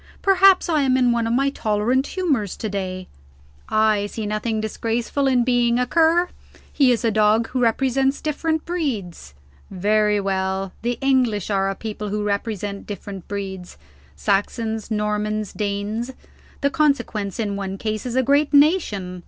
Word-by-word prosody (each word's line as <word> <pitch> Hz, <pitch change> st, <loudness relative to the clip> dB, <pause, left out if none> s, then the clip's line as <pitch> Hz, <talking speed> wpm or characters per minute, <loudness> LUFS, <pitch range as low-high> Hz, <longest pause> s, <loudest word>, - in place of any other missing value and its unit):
Perhaps 390 Hz, -1 st, +5 dB
I 315 Hz, -3 st, +2 dB
am 260 Hz, -2 st, +3 dB
in 250 Hz, -2 st, +3 dB
one 235 Hz, -1 st, 0 dB
of 230 Hz, -, 0 dB
my 275 Hz, +2 st, +2 dB
tolerant 235 Hz, +3 st, 0 dB
humors 280 Hz, -, -1 dB
to 220 Hz, -, -3 dB
day; 185 Hz, -2 st, -4 dB, 0.6 s
I 215 Hz, -1 st, +2 dB
see 215 Hz, +1 st, -5 dB
nothing 215 Hz, +1 st, -2 dB
disgraceful 230 Hz, +5 st, -1 dB
in 250 Hz, -2 st, +3 dB
being 240 Hz, -1 st, +2 dB
a 250 Hz, -, +1 dB
Cur. 335 Hz, +4 st, +3 dB, 0.4 s
He 270 Hz, -3 st, +4 dB
is 240 Hz, 0 st, 0 dB
a 225 Hz, -, +3 dB
dog 215 Hz, +2 st, +3 dB
who 255 Hz, -, -2 dB
represents 265 Hz, +3 st, +1 dB
different 315 Hz, +1 st, -2 dB
breeds. 220 Hz, -, -4 dB, 0.3 s
Very 210 Hz, +2 st, +2 dB
well, 190 Hz, -1 st, -2 dB
the 240 Hz, +1 st, -1 dB
English 250 Hz, -7 st, +1 dB
are 195 Hz, -1 st, +1 dB
a 195 Hz, -, -3 dB
people 210 Hz, 0 st, -5 dB
who 210 Hz, +1 st, -2 dB
represent 205 Hz, -1 st, -3 dB
different 200 Hz, -2 st, -7 dB
breeds: 190 Hz, -3 st, -6 dB, 0.4 s
Saxons, 220 Hz, +2 st, -1 dB
Normans, 210 Hz, -1 st, -1 dB
Danes. 210 Hz, +3 st, -3 dB, 0.5 s
The 280 Hz, -1 st, +1 dB
consequence, 240 Hz, -10 st, 0 dB
in 205 Hz, -3 st, -1 dB
one 195 Hz, -1 st, -4 dB
case, 215 Hz, 0 st, -3 dB
is 250 Hz, -1 st, -4 dB
a 260 Hz, -, +3 dB
great 285 Hz, +3 st, +2 dB
nation. 220 Hz, -, +2 dB
220 Hz, 155 wpm, -22 LUFS, 205-260 Hz, 0.6 s, Perhaps